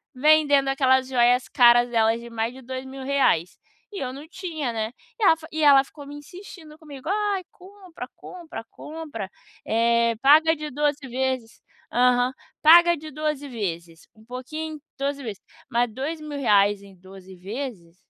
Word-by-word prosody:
vendendo 290 -1 +4
aquelas 260 -1 +2
joias 245 0 +3
caras 240 -1 +5
delas 225 0 +2
de 235 - -10
mais 230 +1 -3
de 265 - -12
2000 260 +1 -7
reais 265 - +1 0.4
e 395 - -5
eu 255 0 -4
não 285 +3 -9
tinha, 320 -10 -4
né. 220 +1 -3 0.3
E - - -2
ela 325 - +6
fi 320 - -12
e 315 -1 -2
ela 275 -2 +7
ficou 285 0 -13
me 290 - -9
insistindo 320 0 -12
comigo, 290 0 -9
"Ai, 405 -2 0
compra, 370 -2 -11
compra, 335 -10 -10
compra, 295 -11 -7 0.4
eh, 235 +1 +2
paga 315 +4 +6
de 305 0 -6
12 290 0 -1
vezes" 255 -2 -3 0.3
aham. 250 +1 +3 0.3
"Paga 345 +2 +7
de 310 +1 -10
12 300 -1 -3
vezes, 170 -7 -6
um 220 - -19
pouquinho 305 +5 -6 0.2
12 280 0 -2
vezes", 210 -4 -7 0.3
mas 240 0 +1
2000 305 +5 -4
reais 205 -9 +2
em 195 -1 -15
12 190 +1 -14
vezes 190 -3 -7
265 Hz, 160 wpm, -24 LUFS, 235-305 Hz, 0.4 s, ela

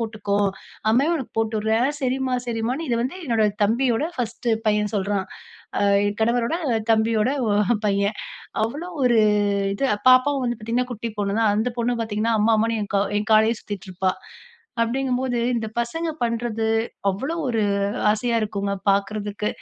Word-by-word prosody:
போட்டுக்கோ. 210 -3 -2 0.5
அம்மாவே 275 +9 +3
உனக்கு 265 - -7
போட்டு 220 0 -1
விட்றேன்". 220 +4 +2
"சரிம்மா 260 -1 0
சரிம்மான்னு" 240 +7 -2
இத 235 - +1
வந்து 270 +8 -4
என்னோட 230 -3 +2 0.2
தம்பியோட 240 +4 +1
1 240 0 -3 0.2
பையன் 210 0 +1
சொல்றான். 195 -1 -1 0.5
ஆ - - 0 0.4
கணவரோட 235 +5 +1 0.4
தம்பியோட 220 +1 +3 0.2
ஒ - - +1 0.2
அ - - +3
பையன். 200 +1 +1 0.5
அவ்ளோ 290 +11 -3
ஒரு 240 -3 +4 0.6
இது 275 +7 -1 0.2
பாப்பாவும் 255 +1 +4
வந்து 240 -2 -1
பாத்தீங்கன்னா 240 +3 -1
குட்டி 230 0 -4
பொண்ணு 200 +1 -1
தான். 220 -2 +3
அந்த 225 +4 +1
பொண்ணு 240 0 0
பாத்தீங்கன்னா 225 +1 -1
அம்மா, 225 +2 +4
அம்மான்னு 225 0 +1
என் 200 - -9
கவ் 200 0 +1
என் 210 - -5
காலயே 220 +1 +4
சுத்திட்டு 200 -2 -7
இருப்பா. 185 +1 0 0.7
அப்டீங்கும் 250 +2 0
போது 250 -2 -1 0.2
இந்த 225 -2 -1
பசங்க 325 +8 -2
பண்றது 230 -1 -1 0.4
அவ்ளோ 265 - -2
ஒரு 225 -3 +1 0.5
ஆசையா 230 +2 0
இருக்குங்க 200 -1 -2 0.2
பாக்குறதுக்கு. 205 +1 -1
225 Hz, 155 wpm, -23 LUFS, 210-245 Hz, 0.7 s, ஒரு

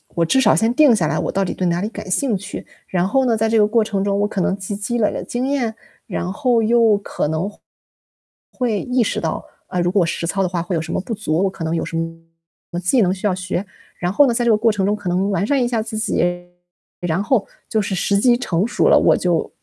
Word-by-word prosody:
我 170 - +2
至 265 +11 +3
少 - - +5
先 225 +1 +2
定 290 -7 +6
下 - - +1
来 - - -1
我 - - -1
到 195 - 0
底 - - -2
对 185 - -2
哪 175 +1 0
里 210 - -2
感 190 - -8
兴 230 -2 +1
趣， 200 - -8 0.2
然 180 0 0
后 265 +4 +2
呢， 230 -2 +2
在 220 0 +1
这 225 - +2
个 210 - +5
过 230 +1 +2
程 200 -2 -2
中 200 0 0
我 205 - +2
可 205 - -4
能 195 - +1
积 195 +1 -5
积 235 +4 -3
累 210 - +3
了 - - -4
经 250 +2 -3
验， 250 -6 0 0.3
然 180 -2 -3
后 240 0 +1
又 225 -2 +4
可 200 - -3
能 160 +6 -1 1.0
会 235 -6 -1
意 250 -1 0
识 - - -1
到， 160 -1 -2 0.2
啊， 180 -1 -3
如 175 0 +2
果 190 -4 +3
实 170 0 -3
操 195 +2 -1
的 - - +1
话 175 -2 -2
会 175 +1 -3
有 160 - 0
什 160 - -5
么 - - 0
不 225 - -5
足， 185 -4 -1
我 195 - +2
可 180 -3 -8
能 160 +1 -1
有 - - -1
什 165 - -4 0.7
么 175 - -3
技 220 +7 +3
能 185 -1 +2
需 195 +2 -6
要 185 - +1
学。 185 +1 -3 0.3
然 175 +1 -1
后 290 - +6
呢 240 - +1
在 240 +1 0
这 235 - +4
个 - - +5
过 225 +1 +3
程 195 -2 -1
中 205 - +2
可 205 -3 -8
能 190 +3 +1
完 195 +1 0
善 275 -2 +2
一 - - +2
下 230 -2 0
自 220 -1 -5
己， 175 -4 0 0.6
然 175 +2 0
后 220 -4 +1 0.2
就 220 - +1
是 195 -1 -3
时 200 +2 +1
机 240 +2 +4
成 195 -6 0
熟 - - +1
了， - - +7
我 - - +4
就 175 -3 0
200 Hz, 290 characters per minute, -20 LUFS, 180-230 Hz, 1.0 s, 了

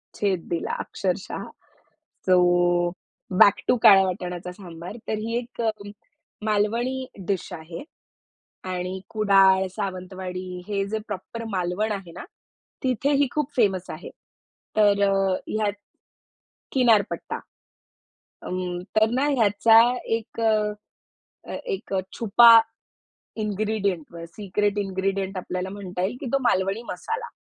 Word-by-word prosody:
छेद 190 -5 0
दिला 170 - -2
अक्षरशः 190 -1 -3 0.8
सो 185 -1 +5 1.0
बॅक 200 0 +8
टू - - +5
काळ्या 195 -3 +9
वाटाणाचा 180 -1 -4
सांबार. 180 +2 -9
तर - - -1
ही 230 +2 -2
एक 240 0 -6
अ, 225 - +2 0.8
मालवणी 235 +5 0 0.2
डीश 195 -4 -2
आहे 165 - -8 0.9
आणि 180 +1 -3
कुडाळ, 195 -3 +4
सावंतवाडी 185 -2 -5
हे 200 -1 -1
जे 220 0 -1
प्रॉपर 230 0 -6
मालवण 185 +3 -1
आहे 195 -4 -5
ना, 180 - -9 0.6
तिथे 260 +2 +1
ही 280 -1 +3
खूप 300 -1 -2
फेमस 190 -5 +2
आहे. 155 - -8 0.7
तर 205 -1 +4
अ, - - +2 0.3
ह्यात 215 -2 0 1.0
किनारपट्टा. 230 -6 +2 1.0
अं, 180 -1 -3 0.2
तर 220 0 +4
ना 275 +2 +2
ह्याचा 225 -3 +5 0.4
एक 230 0 -9
अ, 210 -1 +1 0.8
एक 390 - -4 0.2
छुपा 230 +1 +8 0.8
इन्ग्रीडिएंट 200 -5 -2
अ 170 - -7
सिक्रेट 205 0 -1
इन्ग्रीडिएंट 195 0 -2
आपल्याला 180 +1 -4
म्हणता 185 -3 -5
येईल 215 +6 -1
की 270 - -5
तो 275 - +4
मालवणी 195 -1 +1
मसाला. 450 - -4
200 Hz, 115 wpm, -24 LUFS, 185-220 Hz, 1.0 s, काळ्या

